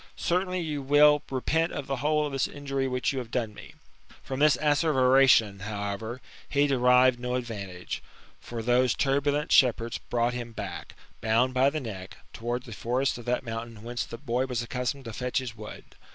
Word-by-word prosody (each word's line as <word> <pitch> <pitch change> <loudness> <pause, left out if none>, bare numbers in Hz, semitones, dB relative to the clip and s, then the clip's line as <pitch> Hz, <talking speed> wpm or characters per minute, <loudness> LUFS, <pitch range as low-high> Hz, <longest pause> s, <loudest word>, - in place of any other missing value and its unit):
Certainly 180 +1 0
you 150 -3 -3
will 145 +2 +5
repent 160 +5 0
of 145 - -4
the 135 0 -2
whole 150 +3 +1
of 145 - -4
this 135 -1 0
injury 135 -2 -3
which 125 +2 -1
you 135 - -2
have 120 -3 -7
done 115 -3 -2
me." - - -12 0.5
From 130 0 -5
this 150 -3 +5
asservation, 135 -8 +4
however, 105 +4 -4 0.3
he 145 0 +3
derived 125 -2 +4
no 125 0 -2
advantage; 100 -8 -5 0.4
for 115 -1 -6
those 125 +1 +3
turbulent 145 +2 0
shepherds 120 -2 +3
brought 120 0 -1
him 120 -1 -6
back, - - -7 0.3
bound 115 +3 +2
by 130 +2 +4
the 155 +2 -3
neck, 100 -8 -8 0.2
towards 120 +2 -3
the 115 - -8
forests 125 +4 -1
of 120 - -11
that 125 +2 0
mountain 115 -1 -6
whence 120 +1 -3
the 115 - -8
boy 130 0 -1
was 120 -2 -2
accustomed 125 +3 -3
to 115 - -6
fetch 125 +2 -2
his 125 -4 -3
wood. 105 -1 -9
125 Hz, 180 wpm, -27 LUFS, 115-140 Hz, 0.5 s, will